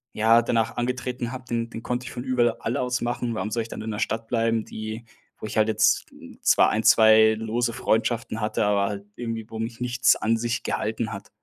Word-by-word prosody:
ja, 115 +2 +5
danach 115 -1 0
angetreten 125 0 -3
habe, 130 -1 -8
den 115 -2 -2
den 115 - -7
konnte 125 0 -3
ich - - -7
von 120 - -5
überl 125 -2 +2
all 115 - -2
aus 125 -1 -1
machen. 120 0 -2
Warum 110 0 -3
soll 115 +1 -1
ich - - -10
dann - - -7
in 110 - -5
der 105 - -4
Stadt 115 0 -2
bleiben, 115 -1 +1
die 110 +1 -7 0.3
wo - - -6
ich - - -6
halt 110 0 +4
jetzt 110 0 +2 0.4
zwar - - +4
1, 110 - -1
2 110 0 +6
lose 115 +2 -1
Freundschaften 115 0 -1
hatte, 105 0 0
aber 100 -1 +2
halt 100 -1 -5
irgendwie, 115 -2 -4
wo 110 - -7
mich 115 +2 -5
nichts 125 0 +3
an 115 +1 0
sich 120 +1 -2
gehalten - - -2
hat? - - -8
115 Hz, 220 wpm, -25 LUFS, 110-120 Hz, 0.4 s, 2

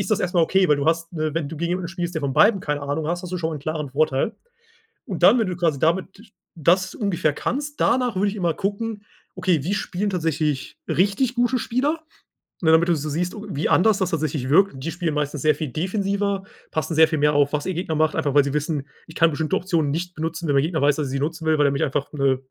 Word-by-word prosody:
Ist 195 - -3
das 215 0 +2
erstmal 180 -3 +2
okay, 190 +1 +3
weil 150 - +4
du 140 +1 -2
hast 165 +1 0
ne, 155 -2 -2
wenn 160 -4 -2
du 160 - -7
gegen 170 +2 -2
jemanden 180 -1 -2
spielst, 175 -1 -4
der 160 - -1
von 140 -2 -2
beiden 205 - +5
keine 150 -4 -2
Ahnung 145 +2 -2
hast, 175 +2 -2
hast 180 -1 -7
du 180 - -1
schon 160 -1 -2
mal 155 - -4
'n - - -9
klaren 150 -1 -4
Vorteil 140 +5 +1 0.7
und - - -5
dann, 245 - +7
wenn 225 - +1
du 180 - -3
quasi 165 -5 0
damit 190 - -1 0.2
das 180 +3 +2
ungefähr 180 -8 0
kannst, 290 - -4
danach 250 -2 +2
würde 200 +2 +2
ich 200 - -4
immer 175 -3 +1
gucken: 210 +1 -3 0.3
„Okay, 180 -6 +1
wie 195 +5 0
spielen 200 +1 -2
tatsächlich 155 -5 -2
richtig 205 +7 +1
gute 245 +1 +1
Spieler?“, 285 +8 -1 0.6
ne, 160 - +4
damit 160 +2 +5
du 170 - +4
so 150 0 -4
siehst, 175 +6 -2 0.2
wie 150 -3 -1
anders 210 +2 +4
das 190 -2 0
tatsächlich 150 -5 -2
wirkt. 195 +2 +4
Die 165 - -2
spielen 175 -4 -2
meistens 150 -1 -2
sehr 155 0 +4
viel 155 - -3
defensiver, 195 +2 -1 0.3
passen 160 +1 -2
sehr 160 0 +6
viel 155 - -1
mehr 150 0 +3
auf, 145 -1 +3
was 150 -1 -2
ihr 185 - -1
Gegner 165 -2 -2
macht, 155 0 +2
einfach 145 - 0
weil 145 - +6
sie 140 0 -3
wissen, 150 -1 -2 0.2
ich 160 - -12
kann 165 0 +4
bestimmte 160 +4 -1
Optionen 170 -6 0
nicht 175 +4 -3
benutzen, 160 +1 -4
wenn 145 - +2
der 140 - +4
Gegner 160 +1 -1
weiß, 145 +1 +4
dass 150 -3 -2
ich - - -6
sie 135 - -1
nutzen 160 +3 -3
will, 155 -1 +3
weil 145 - +4
er 140 - +1
mich 140 - -1
einfach, 140 +1 -1
äh, 140 -2 +2
165 Hz, 255 wpm, -23 LUFS, 150-190 Hz, 0.7 s, dann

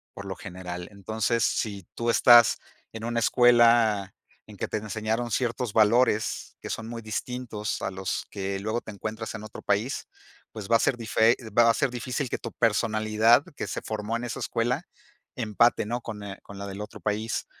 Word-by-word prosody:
por 100 - -8
lo 95 -1 -5
general. 90 -2 -7
Entonces, 110 +3 -1
si 100 -5 -1
tú 115 0 -1
estás 120 0 +7 0.3
en 110 0 -8
una 120 0 -1
escuela 115 -4 +4 0.3
en - - -12
que - - -2
te - - -2
enseñaron 110 +2 -2
ciertos 120 -2 -1
valores 110 0 +2
que - - -8
son 115 0 -4
muy 115 -1 -6
distintos 110 0 -4
a - - -1
los 95 -1 -3
que 95 -1 -3
luego 110 +4 -2
te - - -9
encuentras 110 +2 -5
en 105 - -7
otro 110 - -9
país, 105 +7 -1 0.4
pues, 105 -3 -7
va 115 - +5
a - - -8
ser 120 - +1
dife 115 +1 +3 0.2
va 120 -1 +7
a 115 - +5
ser 135 +2 0
difícil 125 +2 -3
que - - -3
tu 115 - -6
personalidad 110 +1 +3
que - - -4
se - - -4
formó 110 +1 -3
en 120 - -6
esa 120 - -5
escuela, 120 +2 -1 0.5
empate, 115 0 +2
¿no?, 120 +3 -3
con 105 -3 -7
eh, 100 -1 -7
con 100 - -11
la 100 - -6
del 100 +1 -6
otro 105 - -8
país, 110 +2 -2
110 Hz, 190 wpm, -26 LUFS, 105-120 Hz, 0.5 s, estás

